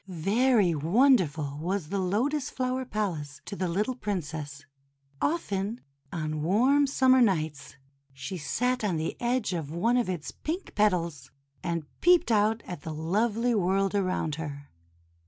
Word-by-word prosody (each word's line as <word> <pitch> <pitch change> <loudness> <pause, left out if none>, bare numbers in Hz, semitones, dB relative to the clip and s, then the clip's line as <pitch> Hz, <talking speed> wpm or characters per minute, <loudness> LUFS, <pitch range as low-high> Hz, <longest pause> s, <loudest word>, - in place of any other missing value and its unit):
Very 200 +3 +2
wonderful 160 - +2
was 180 -2 -2
the 200 +1 -1
Lotus 255 +11 0
Flower 255 0 -2
Palace 165 - -3
to - - -6
the 185 -2 -1
little 210 +9 0
Princess! 155 - -5 0.6
Often 220 - -1 0.3
on 155 -2 -3
warm 255 - +3
summer 260 -1 +4
nights 155 - 0 0.4
she 135 +7 -6
sat 250 - -1
on 195 -5 +1
the 160 +1 -2
edge 240 -4 0
of 160 -5 -3
one 230 +9 +2
of 240 -5 0
its 175 -4 -4
pink 345 +5 -5
petals, 170 -10 0 0.3
and 170 -3 -2 0.2
peeped 355 -5 +5
out 215 +1 +2
at 175 -5 -7
the 160 0 -6
lovely 220 +9 +1
world 195 -1 +1
around 185 -6 0
her. 145 -2 -7
195 Hz, 140 wpm, -28 LUFS, 160-240 Hz, 0.6 s, peeped